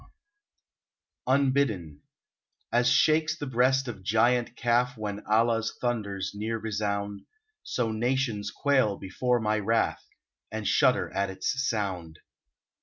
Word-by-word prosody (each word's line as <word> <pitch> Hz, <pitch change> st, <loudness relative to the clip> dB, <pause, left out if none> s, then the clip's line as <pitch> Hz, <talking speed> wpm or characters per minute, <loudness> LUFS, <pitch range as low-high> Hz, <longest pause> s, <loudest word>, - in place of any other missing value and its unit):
lOO 130 Hz, -, +3 dB
UNBIDDEN 130 Hz, -, 0 dB, 0.7 s
A -, -, +3 dB
s 120 Hz, 0 st, +3 dB
shakes 155 Hz, +5 st, +3 dB
the 145 Hz, -, -5 dB
breast 130 Hz, +1 st, +2 dB
of 110 Hz, -5 st, -6 dB
giant 120 Hz, +5 st, +2 dB
Kaf 125 Hz, +1 st, +1 dB
When 105 Hz, -1 st, -5 dB
Allah's 115 Hz, +1 st, +1 dB
thunders 100 Hz, -6 st, -2 dB
near 110 Hz, +2 st, -3 dB
resound, 100 Hz, -2 st, -3 dB, 0.4 s
So 115 Hz, -3 st, -2 dB
nations 115 Hz, -2 st, -1 dB
quail 130 Hz, -8 st, +1 dB
before 120 Hz, +6 st, -1 dB
my 110 Hz, -1 st, 0 dB
wrath, 115 Hz, +2 st, 0 dB, 0.5 s
And -, -, -3 dB
shudder -, -, +3 dB
at 100 Hz, 0 st, 0 dB
its 95 Hz, -1 st, -2 dB, 0.2 s
sound. 95 Hz, -8 st, -3 dB
115 Hz, 120 wpm, -27 LUFS, 100-125 Hz, 0.7 s, lOO